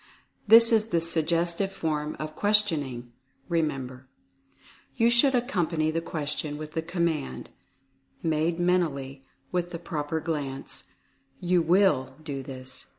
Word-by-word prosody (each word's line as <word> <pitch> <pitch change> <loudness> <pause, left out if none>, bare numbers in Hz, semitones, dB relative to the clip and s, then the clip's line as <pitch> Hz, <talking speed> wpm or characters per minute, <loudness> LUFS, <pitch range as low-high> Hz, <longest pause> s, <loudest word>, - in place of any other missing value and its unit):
(this 230 +2 +9
is 220 -1 +3
the 170 - +2
Suggestive 170 +3 0
Form 155 -4 -3
of 155 0 -6
Questioning, 155 - +2 0.4
remember) 135 -6 -2 0.9
you 235 -1 +3
should 250 +3 +4
accom 240 - 0
pany 155 -2 0
the 165 - -1
question 150 -2 -4
with 155 0 -7
the 160 - -2
COMMAND 165 - -2 0.7
(made 165 +1 0
men 180 +1 +3
tally) 135 -5 -4 0.3
with 175 -1 -1
the 175 - -5
proper 160 -2 -3
glance, 145 -4 -4 0.5
"You 180 -1 +2
WILL 165 -7 +2
do 140 -3 -5
this." 130 -1 -8
160 Hz, 130 wpm, -27 LUFS, 145-180 Hz, 0.9 s, this